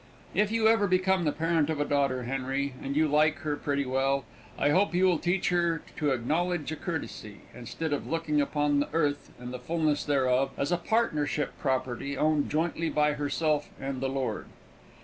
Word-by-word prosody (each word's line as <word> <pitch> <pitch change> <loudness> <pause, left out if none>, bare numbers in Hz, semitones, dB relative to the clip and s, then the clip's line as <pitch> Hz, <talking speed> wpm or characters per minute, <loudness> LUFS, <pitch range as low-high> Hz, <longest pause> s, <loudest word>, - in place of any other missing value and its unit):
If 210 0 +2
you 225 -1 +3
ever 220 -2 +4
become 185 -1 +2
the 150 - +2
parent 165 -1 +1
of 155 -2 -1
a 145 - +1
daughter, 140 -3 +1
Henry, 135 +2 -2
and 140 +1 -3
you 155 +1 +3
like 155 +1 +3
her 150 -1 -1
pretty 140 -1 -1
well, 135 +1 0 0.3
I 145 - +2
hope 185 +2 +2
you 185 +1 +4
will 180 -4 +3
teach 180 +2 0
her 170 -2 +1
to 150 - +1
acknowledge 155 +5 0
a - - -2
courtesy, 145 - -6
instead 145 +6 -4
of 145 - -3
looking 160 -2 0
upon 145 0 +1
the 145 - -1
earth 145 -3 0
and 125 +1 -7
the 125 - -5
fullness 155 +1 0
thereof 135 -2 +1
as 140 - -1
a 175 - +3
partnership 155 -8 0
property, 130 0 -2
owned 155 -1 +2
jointly 165 +1 0
by 150 0 +2
herself 150 +1 0
and 135 -1 -4
the 135 - 0
Lord. 135 -1 -3
150 Hz, 190 wpm, -28 LUFS, 135-165 Hz, 0.3 s, ever